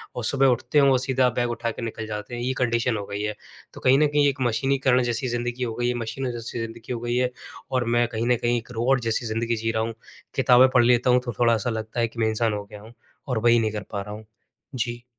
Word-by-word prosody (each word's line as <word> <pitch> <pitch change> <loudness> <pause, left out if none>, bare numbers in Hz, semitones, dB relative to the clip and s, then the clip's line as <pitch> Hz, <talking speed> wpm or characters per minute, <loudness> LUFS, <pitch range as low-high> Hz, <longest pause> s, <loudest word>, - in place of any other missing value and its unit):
और 120 - -4
सुबह 135 +3 +3
उठते 130 +4 +1
हैं 140 - +5
और 130 -1 +4
सीधा 130 -1 +2
बैग 120 -1 0
उठा 115 0 -2
के - - -8
निकल 110 -1 -5
जाते 105 +2 -6
हैं 120 - -5
ये 130 +2 -1
कंडीशन 115 -1 +1
हो 100 - -5
गई 100 +1 -5
है। 105 0 -2 0.4
तो - - -10
कहीं 130 +1 +5
न 150 - +4
कहीं 145 0 +3
एक 140 -1 -1
मशीनीकरण 130 +1 +2
जैसी 120 +2 -1
ज़िंदगी 120 +1 -2
हो 115 -2 -2
गई 120 +1 -1
है, 125 - +1
मशीनों 120 +2 -3
जैसी 120 0 -6
ज़िंदगी 115 +2 -6
हो 115 - -4
गई 120 0 -2
है। 125 0 +1 0.4
और 125 -2 +1
मैं 120 0 +3
कहीं 115 +1 -3
न 125 - +4
कहीं 120 0 +2
एक 120 +1 -7
रोबॉट 125 +3 +1
जैसी 115 +1 -1
ज़िंदगी 115 +1 -1
जी 115 0 -1
रहा 110 0 0
हूँ। 115 0 -3 0.4
किताबें 125 +1 +6
पढ़ 120 -2 +5
लेता 125 +1 +3
हूँ 125 - +5
तो 120 - -3
थोड़ा-सा 115 -1 +2
लगता 110 +1 -4
है 115 - +2
कि 115 +1 -11
मैं 110 - +2
इंसान 110 0 0
हो 105 0 -3
गया 105 0 -12
हूँ। 115 +2 -14 0.3
और 125 -4 0
वही 120 +1 +4
नहीं 110 -1 0
कर 105 -2 -5
पा 100 -2 -3
रहा 105 +1 -7
हूँ। 110 - -11 0.5
जी। 120 -1 -3
120 Hz, 270 wpm, -24 LUFS, 115-125 Hz, 0.5 s, किताबें